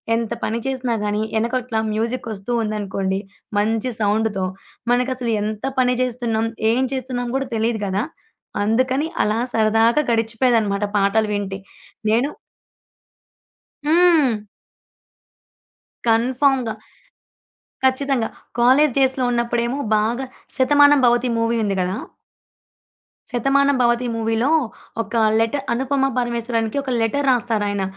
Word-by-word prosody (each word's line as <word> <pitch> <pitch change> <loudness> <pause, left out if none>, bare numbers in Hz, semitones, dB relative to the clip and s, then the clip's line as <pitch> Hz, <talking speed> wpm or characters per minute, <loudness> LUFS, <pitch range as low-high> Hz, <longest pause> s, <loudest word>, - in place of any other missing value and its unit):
ఎంత 230 0 -2
పని 225 +1 -1
చేసినా 255 -3 -1
గానీ, 210 +1 0
వెనకట్ల 235 +1 -1 0.2
మ్యూజిక్ 230 +3 -2
ఒస్తూ 195 +3 -7
ఉందనుకోండి 195 -2 -2 0.4
మంచి 225 +4 0
సౌండ్‌తో. 210 -2 +1 0.5
మనకసలు 250 -1 0
ఎంత 215 0 -4 0.2
పని 250 -1 +3
జేస్తున్నాం? 235 -3 -1 0.2
ఏం 250 +3 +2
చేస్తున్నాం 250 -2 -3
కూడా 270 - -3
తెలీదు 220 -1 0
గదా! 195 +2 -1 0.6
అందుకని 255 +7 +1 0.2
అలా 215 +2 0
సరదాగా 225 +4 +3
గడిచిపోయేదనమాట 225 -2 +1
పాటలు 205 +2 +2
వింటే. 200 -1 -3 0.5
నేను 235 +6 +2 1.6
హ్మ్. 305 -9 +3 1.6
కన్ఫర్మ్‌గా. 250 0 +2 1.1
ఖచ్చితంగా. 260 -2 +1 0.3
కాలేజీ 260 +3 +5
డేస్‌లో 265 -1 +2
ఉన్నప్పుడేమో 235 +2 0 0.2
బాగా 230 +5 0 0.3
'శతమానం 290 +1 +5
భవతి' 240 0 +2
మూవీ 230 +1 +1
ఉంది 200 -2 -1
గదా! 185 +3 -1 1.3
శతమానం 275 +3 +2
భవతి 240 +1 +2
మూవీలో, 225 +3 0 0.5
ఒక 230 - -11 0.2
లెట 225 +2 +1 0.2
అనుపమ 270 +2 +1
పరమేశ్వరానికి 235 -1 -1
ఒక 275 - -5
లెటర్ 280 +6 0
రాస్తారాయన. 215 -5 0
235 Hz, 105 wpm, -21 LUFS, 220-255 Hz, 1.6 s, కాలేజీ